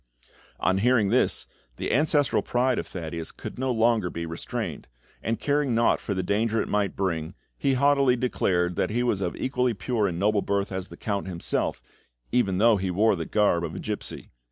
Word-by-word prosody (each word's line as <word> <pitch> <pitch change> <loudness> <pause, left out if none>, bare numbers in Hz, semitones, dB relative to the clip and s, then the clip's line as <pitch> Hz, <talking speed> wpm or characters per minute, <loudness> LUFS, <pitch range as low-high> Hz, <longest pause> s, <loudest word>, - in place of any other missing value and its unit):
On 95 +1 +2
hearing 115 -2 +3
this, 125 +4 +2 0.3
the - - -2
ancestral 145 0 +3
pride 125 +1 +1
of - - -5
Thaddeus 85 -2 -5
could - - -8
no 130 0 0
longer 115 -5 +2
be 85 0 -5
restrained, 80 0 -5 0.3
and 115 0 -2
caring 145 -4 +1
naught 115 +1 +3
for 100 - -3
the 95 - -1
danger 110 +4 +1
it - - -1
might 100 -2 0
bring, 85 -2 -2 0.2
he 135 -2 +1
haughtily 140 -1 +4
declared 90 -8 0
that - - +1
he 120 +3 0
was 105 -5 0
of 90 -3 -2
as - - -9
equally 125 -3 0
pure 105 +1 0
and 85 -3 -3
noble 105 +2 +2
birth 100 0 -1
as 95 0 -4
the - - -12
Count 100 -2 -3
himself, 85 -2 -2 0.5
even 100 -7 +2
though 110 +1 +5
he 95 -1 -2
wore 105 +4 +3
the 85 -2 -4
garb 105 -5 +2
of 85 0 -4
a - - -5
gipsy. 105 -1 -5
105 Hz, 200 wpm, -26 LUFS, 95-125 Hz, 0.5 s, though